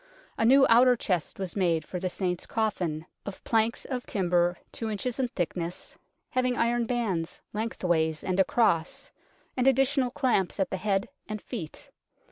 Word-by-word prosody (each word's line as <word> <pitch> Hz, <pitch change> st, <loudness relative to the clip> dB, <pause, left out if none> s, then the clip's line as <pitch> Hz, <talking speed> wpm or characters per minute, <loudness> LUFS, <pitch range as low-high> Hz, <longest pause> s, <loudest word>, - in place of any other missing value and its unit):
A 225 Hz, -, +1 dB
new 270 Hz, +3 st, +7 dB
outer 245 Hz, +2 st, +6 dB
chest 180 Hz, -8 st, -2 dB
was 190 Hz, -3 st, -4 dB
made 170 Hz, -5 st, +1 dB
for 180 Hz, -, -5 dB
the 185 Hz, +1 st, -1 dB
Saint's 180 Hz, -1 st, -2 dB
coffin, 180 Hz, -8 st, -1 dB, 0.2 s
of 200 Hz, -, -8 dB
planks 225 Hz, +1 st, +1 dB
of 255 Hz, -2 st, -4 dB
timber 175 Hz, -2 st, +1 dB
two 225 Hz, -, -4 dB
inches 230 Hz, +5 st, -3 dB
in 260 Hz, -, +2 dB
thickness, 175 Hz, -5 st, -4 dB, 0.4 s
having 255 Hz, -1 st, +1 dB
iron 235 Hz, 0 st, +1 dB
bands 200 Hz, -9 st, -2 dB
lengthways 175 Hz, -8 st, 0 dB
and 185 Hz, 0 st, -1 dB
across, 185 Hz, -5 st, +1 dB, 0.4 s
and 255 Hz, 0 st, +1 dB
additional 270 Hz, 0 st, +3 dB
clamps 240 Hz, -8 st, 0 dB
at 190 Hz, -, 0 dB
the 190 Hz, -, -1 dB
head 195 Hz, 0 st, 0 dB, 0.2 s
and 215 Hz, 0 st, -3 dB
feet. 190 Hz, -, -7 dB
205 Hz, 155 wpm, -28 LUFS, 180-240 Hz, 0.4 s, new